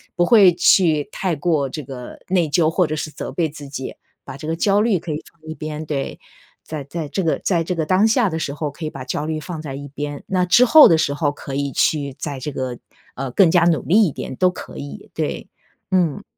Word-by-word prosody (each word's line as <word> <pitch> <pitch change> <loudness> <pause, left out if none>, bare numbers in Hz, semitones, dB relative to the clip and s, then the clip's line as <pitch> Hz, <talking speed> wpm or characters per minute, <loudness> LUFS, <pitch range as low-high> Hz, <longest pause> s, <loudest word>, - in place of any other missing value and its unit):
不 175 - +3
会 195 -3 +6
去 165 -3 +3
太 185 -4 -2
过 150 -2 0
这 150 +2 -6
个 125 -2 -9
内 180 -3 +2
疚 155 +1 +2
或 170 0 +1
者 155 - -2
是 155 0 -4
责 - - -6
备 165 -3 0
自 145 -1 -10
己， 135 -1 -6 0.3
把 135 0 -9
这 155 - -8
个 165 - -1
焦 200 +4 +2
虑 215 -5 +2
可 165 -1 -6
以 150 - -4
放 170 - -37
一 - - -3
边， 155 0 -6
对。 140 -2 -4 0.5
在 155 -3 -4
在 150 +2 -5
这 175 +6 -2
个 160 - 0
在 170 -4 0
这 180 +2 -2
个 165 -2 -1
当 185 +7 +3
下 230 -2 +3
的 160 - -3
时 140 -3 -3
候 150 +1 -3
可 155 +3 -8
以 155 - -3
把 - - -7
焦 145 +3 -3
虑 155 0 -2
放 165 0 -6
在 145 -4 -6
一 140 +1 -7
边， 145 +1 -6
那 185 -1 +1
之 235 +8 +5
后 300 +4 +9
的 165 -4 +4
时 140 -2 0
候 145 -1 0
可 140 -2 -8
以 140 0 -1
去 140 -1 +1
再 145 -3 -4
这 140 +3 -4
个， 130 -3 -4 0.4
呃， 135 0 -4
更 175 +6 +5
加 175 0 +4
努 170 -2 +3
力 210 +7 +4
一 160 - -1
点 130 - -6
都 185 +5 +3
可 65 - -10
以。 70 +1 -9
对。 - - -3 0.4
嗯。 180 -6 +1
155 Hz, 265 characters per minute, -20 LUFS, 140-175 Hz, 0.5 s, 后